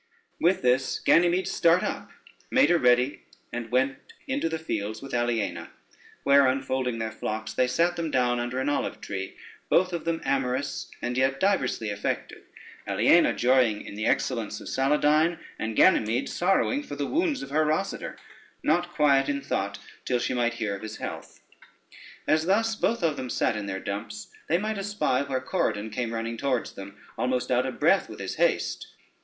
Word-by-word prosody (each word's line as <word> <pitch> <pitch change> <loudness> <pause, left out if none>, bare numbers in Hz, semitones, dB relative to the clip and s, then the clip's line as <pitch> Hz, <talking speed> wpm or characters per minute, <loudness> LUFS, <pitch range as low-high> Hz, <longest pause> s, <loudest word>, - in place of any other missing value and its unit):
With 175 -2 +2
this 125 +1 +2
Ganymede 175 +2 +3
start 170 -2 +3
up, - - -4 0.4
made 260 -7 +4
her 175 - +4
ready, 125 +1 +3 0.3
and 120 -1 -4
went 130 +2 +1 0.3
into 270 - -1
the 160 - -2
fields 110 -9 -3
with 135 -1 -9
Aliena, 115 -8 -1 0.5
where 140 -1 +6
unfolding 130 -2 -1
their 110 -1 -3
flocks, 110 0 -4
they 125 - +2
sate 170 +7 +1
them 165 -1 -2
down 125 -3 +1
under 120 +2 -2
an 130 - -1
olive 145 - -1
tree, 95 -1 -6 0.3
both 185 0 +3
of 170 - -3
them 165 -1 0
amorous, 135 0 -1
and 120 +1 -1
yet 135 +1 +1
diversely 190 - +1
affected; 100 0 -3 0.5
Aliena - - +4
joying 125 -4 +3
in - - -8
the 110 +2 -2
excellence 115 -5 0
of - - -10
Saladyne, 150 +4 +2 0.2
and 110 0 -3
Ganymede 115 +6 +4
sorrowing 195 +10 +1
for 215 - -7
the 145 0 -2
wounds 315 - 0
of 135 - -9
her 155 +2 +3
Rosader, 155 +6 -2 0.5
not 175 +3 +2
quiet 145 -4 +3
in 140 -1 0
thought 100 +1 -2 0.3
till 125 - 0
she 120 - -1
might 120 -1 0
hear 105 -4 -2
of 95 - -9
his 110 0 -7
health. - - -7 0.8
As 155 +2 +2
thus 225 +3 +2
both 230 -2 0
of 155 -3 +1
them 130 - -5
sate 115 - +1
in 105 -1 -4
their 95 -1 -3
dumps, 105 +1 -6 0.2
they 170 - +4
might 215 +2 -2
espy 195 -10 0
where 130 -2 -1
Corydon 110 - -1
came 115 +1 -2
running 115 0 -3
towards 130 -2 -1
them, 100 +1 -10 0.2
almost 125 0 0
out 125 +1 +2
of 130 - -6
breath - - +3
with - - -9
his - - -5
haste. - - 0
130 Hz, 180 wpm, -26 LUFS, 115-165 Hz, 0.8 s, where